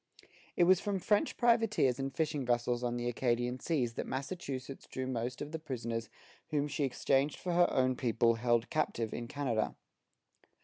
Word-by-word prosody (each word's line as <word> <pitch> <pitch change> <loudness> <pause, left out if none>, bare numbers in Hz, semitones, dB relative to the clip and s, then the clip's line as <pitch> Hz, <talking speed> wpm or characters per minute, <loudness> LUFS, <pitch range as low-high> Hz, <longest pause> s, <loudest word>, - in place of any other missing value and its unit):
It 175 - +4
was 185 +1 +6
from 205 -1 -1
French 205 +3 +1
privateers 225 - +3
and 135 0 -2
fishing 150 0 -1
vessels 120 0 0
on 120 0 -1
the 120 0 -2
Acadian 120 +1 0
seas 125 -8 0
that - - -4
Massachusetts 135 -2 -5
drew 130 - -4
most 125 0 -3
of 145 - -8
the 160 - -4
prisoners 115 -6 -4 0.4
whom 150 -2 +1
she 145 0 -1
exchanged 135 +2 +1
for 180 - -3
her 175 0 +5
own 130 0 +2
people 115 -2 +2
held 120 0 +1
captive 115 -7 -1
in 120 0 -4
Canada. 120 -5 -1
130 Hz, 170 wpm, -33 LUFS, 120-155 Hz, 0.4 s, was